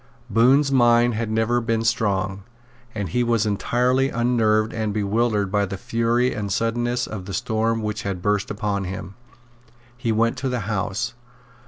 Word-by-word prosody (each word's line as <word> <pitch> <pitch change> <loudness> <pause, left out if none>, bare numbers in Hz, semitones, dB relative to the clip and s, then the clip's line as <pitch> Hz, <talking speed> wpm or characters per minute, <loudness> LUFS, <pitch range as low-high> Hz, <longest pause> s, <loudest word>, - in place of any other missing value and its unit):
Bohun's 135 +5 +4
mind 120 -2 +4
had 110 0 -2
never 110 +2 +1
been 115 -1 0
strong; 100 -4 0 0.5
and 100 -4 -3
he 125 +9 +1
was 115 -2 +1
entirely 125 +5 +1
unnerved 115 -3 +1
and 110 -2 -2
bewildered 105 -1 0
by 105 0 +2
the 100 0 -4
fury 115 +4 0
and 100 -2 -4
suddenness 120 +3 0
of 100 -4 -7
the 100 - -5
storm 115 -1 0
which 105 0 -3
had 100 -2 -3
burst 105 +2 0
upon 100 -2 -2
him. 90 0 -6 0.8
He 120 -1 -2
went 115 +3 +1
to 130 +1 -2
the 125 -2 -2
House. 105 +3 -2
115 Hz, 160 wpm, -23 LUFS, 105-120 Hz, 0.8 s, Bohun's